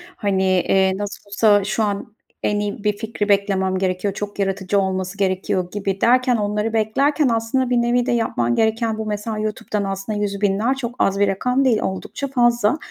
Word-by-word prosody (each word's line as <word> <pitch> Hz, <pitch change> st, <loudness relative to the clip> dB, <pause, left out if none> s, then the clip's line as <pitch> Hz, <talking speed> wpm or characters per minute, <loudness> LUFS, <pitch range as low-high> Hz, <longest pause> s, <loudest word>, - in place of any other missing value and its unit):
Hani, 195 Hz, -3 st, 0 dB
eee, 190 Hz, 0 st, +2 dB
nasıl 205 Hz, 0 st, -6 dB
olsa 205 Hz, 0 st, +4 dB
şu 215 Hz, +3 st, -1 dB
an 205 Hz, +1 st, -3 dB, 0.3 s
en 205 Hz, 0 st, +1 dB
iyi 205 Hz, 0 st, -4 dB
bir 210 Hz, -1 st, 0 dB
fikri 215 Hz, -1 st, -3 dB
beklemem 195 Hz, -2 st, +1 dB
gerekiyor, 185 Hz, +1 st, -1 dB
çok 205 Hz, +1 st, -6 dB
yaratıcı 195 Hz, 0 st, 0 dB
olması 190 Hz, 0 st, -2 dB
gerekiyor 185 Hz, -2 st, -1 dB
gibi 195 Hz, -1 st, -3 dB
derken 250 Hz, +1 st, +4 dB
onları 210 Hz, +1 st, -1 dB
beklerken 275 Hz, +7 st, +2 dB
aslında 230 Hz, +3 st, 0 dB
bir 250 Hz, -, +2 dB
nevi 240 Hz, +1 st, +1 dB
de 255 Hz, -, 0 dB
yapman 120 Hz, -, 0 dB
gereken 225 Hz, 0 st, +1 dB
bu, 220 Hz, -, -4 dB
mesela. 215 Hz, +1 st, -3 dB
YouTube'dan 215 Hz, -1 st, -2 dB
aslında 195 Hz, +2 st, -3 dB
100.000'ler 205 Hz, +4 st, 0 dB
çok 245 Hz, -2 st, -5 dB
az 195 Hz, 0 st, +2 dB
bir 205 Hz, -, +4 dB
rakam 250 Hz, +7 st, +1 dB
değil 230 Hz, -4 st, +3 dB
oldukça 190 Hz, +9 st, -4 dB
fazla 240 Hz, -2 st, +2 dB
205 Hz, 175 wpm, -21 LUFS, 195-225 Hz, 0.3 s, olsa